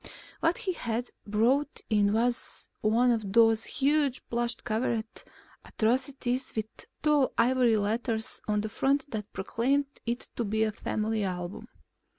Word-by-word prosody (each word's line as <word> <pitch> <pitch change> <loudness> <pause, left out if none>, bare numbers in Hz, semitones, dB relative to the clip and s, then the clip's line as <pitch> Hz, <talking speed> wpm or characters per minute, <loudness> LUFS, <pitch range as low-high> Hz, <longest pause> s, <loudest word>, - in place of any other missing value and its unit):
What 330 +2 +2
he 380 -5 -2
had 235 -5 -3 0.2
brought 245 +8 +1
in 205 -2 +3
was 235 +3 -1
one 235 +3 +3
of 215 -4 -1
those 225 -1 +5
huge, 285 -2 +1
plush 235 0 0
covered 225 0 -1 0.6
atrocities 255 +2 0
with 220 -1 -1 0.4
tall 300 -3 +3
ivory 240 -1 +4
letters 220 +2 -1
on 210 -1 +1
the 215 - -3
front 275 +5 0
that 210 -2 -4
proclaimed 270 +8 -1
it 240 +1 -2
to 235 - 0
be 220 +1 +1
a 220 - +1
Family 215 0 -2
Album. 180 -1 -4
230 Hz, 140 wpm, -29 LUFS, 215-260 Hz, 0.6 s, those